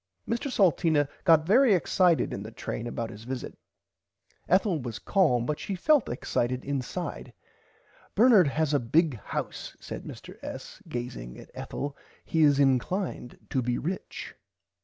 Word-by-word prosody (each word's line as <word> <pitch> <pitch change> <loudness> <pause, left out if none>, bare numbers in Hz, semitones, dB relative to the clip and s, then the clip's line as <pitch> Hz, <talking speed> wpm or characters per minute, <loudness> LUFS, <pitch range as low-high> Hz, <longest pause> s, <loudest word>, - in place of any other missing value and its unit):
Mr 235 +4 -2
Salteena 165 - +3 0.2
got 160 -3 +6
very 225 +3 +5
excited 180 -1 +2
in 100 - -4
the 105 - -7
train 115 +1 -5
about 115 -1 -4
his 105 +2 -11
visit. 130 +1 -5 0.9
Ethel 185 -2 +3
was 120 -3 -5
calm 150 - +2
but 150 +2 -2
she 195 - -3
felt 290 - +3
excited 125 0 -1
inside. 135 -4 -4 0.8
Bernard 215 - +6
has 150 +2 0
a 145 - +4
big 140 +1 +2
house - - -5
said - - -7
Mr. - - -10
S. - - -8
gazing 90 - -5
at - - -13
Ethel 145 0 -5 0.3
he 160 - +1
is 145 -2 +5
inclined 135 +2 0
to 130 - +1
be 120 0 0
rich. 180 +6 -5
150 Hz, 145 wpm, -28 LUFS, 125-185 Hz, 0.9 s, got